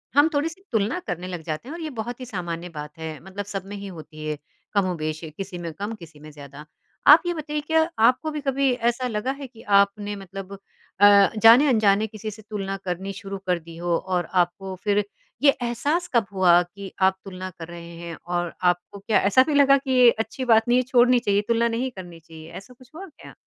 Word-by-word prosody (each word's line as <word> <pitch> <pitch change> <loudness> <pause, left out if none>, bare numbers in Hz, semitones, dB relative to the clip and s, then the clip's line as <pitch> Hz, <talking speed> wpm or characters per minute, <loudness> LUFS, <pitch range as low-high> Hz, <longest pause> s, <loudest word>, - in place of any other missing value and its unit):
हम 290 +3 +6
थोड़ी-सी 325 +5 -2
तुलना 220 - 0
करने 180 -1 -4
लग 175 -3 -5
जाते 155 +8 -5
हैं 295 - -6
और 340 - -8
ये 315 - -4
बहुत 240 +3 -4
ही 255 - -6
सामान्य 175 -6 -5
बात 150 -2 -9
है। 160 -1 -6
मतलब 190 +1 -6
सब 195 -1 -5
में 205 +1 -8
ही 200 0 -7
होती 160 -4 -11
है 155 - -3
ये 150 - -3 0.4
कमोबेश़। 165 -5 -1
किसी 195 -2 -6
में 170 -2 -5
कम 205 +6 -5
किसी 165 -6 -14
में 155 +1 -12
ज़्यादा। 145 0 -12 0.4
आप 300 +3 +10
ये 350 - 0
बताइए 300 -2 -4
क्या 320 0 +3 0.3
आपको 305 +5 +1
भी 300 -1 -4
कभी 275 -1 +1
ऐसा 240 +1 0
लगा 230 +3 -2
है 275 0 -7
कि 230 -2 -16 0.2
आपने 205 +1 0
मतलब 195 0 -9 0.4
अ, 200 -1 +7
जाने-अनजाने 225 -3 +5
किसी 215 0 -7
से 215 - -12
तुलना 195 -2 -3
करनी 185 +2 -3
शुरू 195 -1 -7
कर 180 -1 +1
दी 165 0 -13
हो 170 0 0
और 180 -2 -2
आपको 185 +1 0
फिर 205 0 +2 0.4
ये 285 - +6
एहसास 290 +9 -1
कब 235 -3 +3
हुआ 180 -2 +5
कि 195 +2 -10
आप 190 0 +3
तुलना 185 -1 -6
कर 165 - -7
रहे 170 0 -10
हैं? 170 -1 -7
और 175 -1 -2
आपको 180 +3 0
क्या 205 +2 +2
ऐसा 260 +6 +6
भी 305 - 0
लगा 275 -1 +6
कि 270 -1 -5
ये 250 -2 +7
अच्छी 225 +4 -3
बात 225 -2 +4
नहीं 240 +1 +4
है 255 - +3
छोड़नी 250 0 +4
चाहिए 205 -3 +1
तुलना 235 0 +2
नहीं 240 +3 -2
करनी 175 -6 -10
चाहिए? 160 0 -13
ऐसा 250 +6 -11
कुछ 250 0 -20
हुआ 380 +4 -7
क्या? 315 - -15
200 Hz, 220 wpm, -24 LUFS, 175-245 Hz, 0.4 s, आप